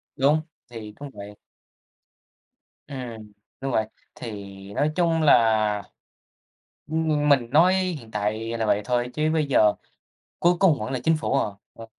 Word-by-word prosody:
Đúng. 145 +4 +3 0.3
Thì 110 -3 -8
cũng 145 0 -7
vậy. 105 0 -10 1.5
Ừm, 120 -6 -8 0.3
đúng 135 0 -2
vậy. 110 - +1 0.3
Thì 115 - -7 0.4
nói 150 +8 +1
chung 165 -2 +2
là, 110 -7 +3 1.0
ừm, 155 -1 0
mình 130 -5 +3
nói 170 +7 +5
hiện 180 -11 -2
tại 110 +2 -2
là 110 - 0
vậy 105 0 +2
thôi 120 +2 -1
chứ 155 0 +1
bây 155 -2 +1
giờ 105 -7 +4 0.7
cuối 175 +1 +4
cùng 180 -7 +4
vẫn 110 +3 -4
là 130 - -2
chính 160 0 +3
phủ 155 - -2
à, - - +1 0.3
ờ. 115 - -10
130 Hz, 150 wpm, -24 LUFS, 110-155 Hz, 1.5 s, nói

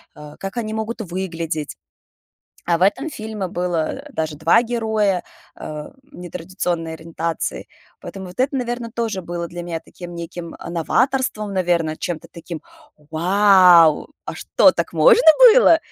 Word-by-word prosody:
а, 150 0 -12
как 195 +2 -6
они 220 -2 -3
могут 220 +2 -4
выглядеть. 170 -5 -4 0.9
А 170 -1 +3
в - - -2
этом 260 +11 +2
фильме 215 -5 -5
было, 175 -3 -2
э, 290 0 -14
даже 155 -5 -3
2 165 +9 +4
героя, 220 -5 0 0.3
а, 150 -1 -8
нетрадиционной 175 - -5
ориентации. 165 0 -4 0.3
Поэтому 190 -1 -8
вот 180 +7 -7
это, 270 +2 +1
наверно, 240 -2 -3
тоже 225 -6 -3
было 170 0 -4
для 175 0 -7
меня 170 -1 -4
таким 175 +1 -11
неким, 170 0 -7
а, - - -8
новаторством, 215 - 0
наверно, 170 -4 0
чем-то 170 -2 -5
таким 170 -1 -8 0.5
Вау! 180 -2 +5 0.2
А - - -6
что, - - +3
так - - -3
можно - - +5 0.3
было? 415 -9 +6
180 Hz, 145 wpm, -20 LUFS, 165-220 Hz, 0.9 s, было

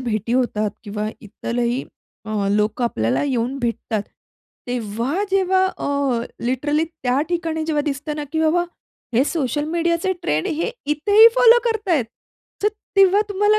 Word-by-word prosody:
भेटी 230 -2 -2
होतात 215 -5 +1
किंवा 210 +1 -3
इतरही 235 +3 -2 0.4
अ, 210 -2 -1
लोकं 210 +4 +1
आपल्याला 115 - 0
येऊन 260 0 -1
भेटतात, 230 -3 -2 0.6
तेव्हा-जेव्हा 355 - 0
अ, 280 -4 0 0.2
लिटरली 290 +5 +1
त्या 285 -5 -1
ठिकाणी 325 -2 -1
जेव्हा 300 -2 +1
दिसतं 295 +1 -3
ना, 295 - -3
की 320 - 0
बाबा 330 +2 +2 0.5
हे 255 +4 +4
सोशल 295 -2 -1
मीडियाचे 340 +2 0
ट्रेंड 155 - 0
हे 330 +9 -1 0.2
इथेही 405 +10 +6
फॉलो 480 -1 +7
करतायेत. 410 - +1 0.6
तर 420 - +4 0.3
तेव्हा 390 +1 +6
तुम्हाला 415 +2 +3
290 Hz, 135 wpm, -21 LUFS, 235-345 Hz, 0.6 s, फॉलो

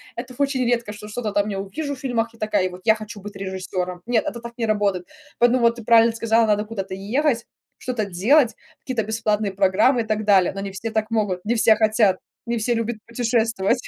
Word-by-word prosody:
Это 250 +1 -7
очень 275 -2 +1
редко, 235 -3 0
что 210 0 -10
что-то 215 0 -4
там 205 +1 +1
я 195 -2 -3
увижу 285 +9 -4
в - - -15
фильмах 235 -3 -1
и - - -19
такая: 210 -3 +1
"Вот 180 +1 -11
я 220 - +6
хочу 215 -1 -9
быть 205 +1 -9
режиссёром". 185 -2 -4
Нет, 240 -2 +1
это 235 - -4
так 235 0 -8
не 235 - -1
работает. 200 -4 0 0.3
Поэтому 240 +1 +4
вот 235 0 +4
ты 235 - -9
правильно 230 +1 +5
сказала: 230 0 +3
надо 210 0 +1
куда-то 195 -4 -5
ехать, 235 +5 0 0.3
что-то 245 -4 -3
делать, 225 - +3 0.2
какие-то 250 -4 -2
бесплатные 215 -2 -1
программы 200 +6 +3
и - - -2
так 215 -1 -2
далее. 195 -4 +4
Но 195 - -5
не 195 0 -5
все 210 +4 -5
так 220 0 -2
могут, 205 -5 -1
не 225 - +1
все 220 -1 +5
хотят, 215 -3 +3 0.3
не 235 0 0
все 230 +2 0
любят 230 0 -1
путешествовать. 230 -1 0
220 Hz, 215 wpm, -22 LUFS, 200-235 Hz, 0.3 s, я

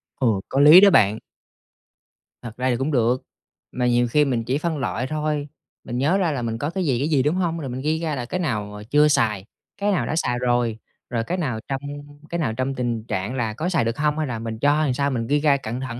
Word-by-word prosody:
Ồ, 110 -7 +1
có 135 - 0
lý 155 +6 +9
đó 205 - +8
bạn! 110 - +4 1.2
Thật 115 -2 -9
ra 130 +1 0
thì 120 - +1
cũng 135 +5 -1
được, 125 -1 +1 0.5
mà 125 -1 -1
nhiều 120 0 +2
khi 150 +5 +3
mình 120 -4 -1
chỉ 130 +4 -1
phân 160 +1 -2
loại 125 -1 -2
thôi, 150 0 -2 0.4
mình 120 - -5
nhớ 150 +9 +2
ra 175 -5 +1
là 135 - -3
mình 115 -1 -3
có 145 +6 -2
cái 185 +1 -2
gì, 130 -4 +1
cái 145 - 0
gì, 140 -5 +2
đúng 150 +4 +1
hông? 170 -3 -1
Rồi 140 -4 -5
mình 125 +1 -5
ghi 155 +2 0
ra 160 -3 -2
là 125 -3 -4
cái 180 +9 -3
nào 105 - -3
chưa 150 +1 +5
xài, 105 -9 +1 0.3
cái 205 0 0
nào 190 - 0
đã - - -2
xài 125 -7 0
rồi, 120 -2 0 0.3
rồi 115 -2 -1
cái 180 +9 -3
nào 130 -10 -2
trong 135 0 -3 0.5
cái 170 - -3
nào 130 -9 -1
trong 130 +3 -2
tình 120 -3 -2
trạng 100 +6 -3
là 115 -4 -1
có 160 +10 -3
xài 160 -10 +1
được 115 0 -2
hông, 150 +1 0
hay 155 - -1
là 120 -3 -4
mình 110 -1 -5
cho 145 +3 +3
hay 155 - +2
làm 130 - +1
sao 140 +2 0
mình 115 -4 -2
ghi 145 +3 +2
ra 145 -2 +3
cận 120 -2 -5
thận 125 -2 -5
130 Hz, 265 wpm, -22 LUFS, 120-150 Hz, 1.2 s, lý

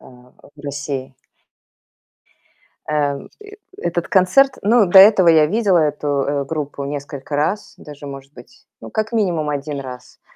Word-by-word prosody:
э, - - -20
в 125 +3 -19
России. 140 -2 -5 1.8
Э, 145 -2 0 0.6
этот 175 - -3
концерт 235 +9 +3
ну 215 0 +4
до 185 +2 +6
этого 190 -3 +7
я 155 -2 +5
видела 200 -1 +2
эту, 150 -1 -1
э, 140 0 -1
группу 145 -1 -5
несколько 140 0 -6
раз, 180 +8 -2
даже, 145 -1 -12
может 135 0 -10
быть, 120 0 -17
ну, 115 - -10
как 215 +2 -3
минимум, 175 -9 0
1 145 0 -4
раз. 125 -2 -11
150 Hz, 140 wpm, -19 LUFS, 140-185 Hz, 1.8 s, этого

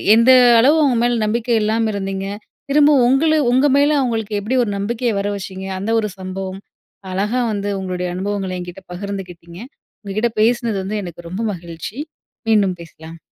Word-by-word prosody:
எந்த 230 +3 +6 0.3
அளவு 280 +7 +5
அவங்க 265 -4 +2
மேல 240 0 +2
நம்பிக்கை 235 +3 0
இல்லாம 220 +1 +1
இருந்தீங்க, 195 -1 -3 0.5
திரும்ப 295 +1 +5 0.2
உங்களு 300 +5 +3 0.2
உங்க 260 +3 +3
மேல 285 +1 +4
அவுங்களுக்கு 225 -4 -2
எப்படி 220 +6 -2
ஒரு 215 - -2
நம்பிக்கையை 230 +3 -1
வர 200 - -1
வச்சீங்க, 190 -1 -7
அந்த 205 +4 -2
ஒரு 210 -1 -2
சம்பவம், 190 0 -5 0.5
அழகா 210 +7 0
வந்து 205 -1 -2
உங்களுடைய 180 -1 -3
அனுபவங்கள 195 0 -3
என்கிட்ட 180 +1 -9
பகிர்ந்துக்கிட்டீங்க. 180 -3 -7 0.4
உங்க 200 -2 -7
கிட்ட 235 +1 +1
பேசுனது 230 -1 +1
வந்து 210 +3 -3
எனக்கு 175 -1 -9
ரொம்ப 190 +6 -4
மகிழ்ச்சி! 170 +5 -8 0.5
மீண்டும் 200 -4 +3
பேசலாம். 165 0 -12
205 Hz, 160 wpm, -19 LUFS, 185-235 Hz, 0.5 s, எந்த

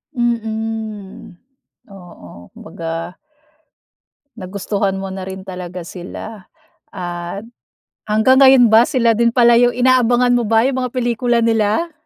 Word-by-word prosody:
Mhm. 220 -4 -4 0.6
Oo. 170 - -14
Kumbaga 165 +2 -7 1.2
nagustuhan 200 0 -3
mo 190 0 -6
na 190 -1 -6
rin 190 0 -8
talaga 180 -2 -8
sila 190 +4 -9 0.5
at 175 +2 -6 0.7
hanggang 220 +5 +3
ngayon 265 -3 +7
ba 225 +2 +7
sila 245 -6 +2
din 235 +1 +2
pala 240 -1 +4
yung 245 0 +3
inaabangan 250 -1 +3
mo 240 - 0
ba 225 +1 +3
yung 260 0 -1
mga 250 -2 -4
pelikula 240 -1 0
nila? 230 +8 0
220 Hz, 120 wpm, -17 LUFS, 190-240 Hz, 1.2 s, ngayon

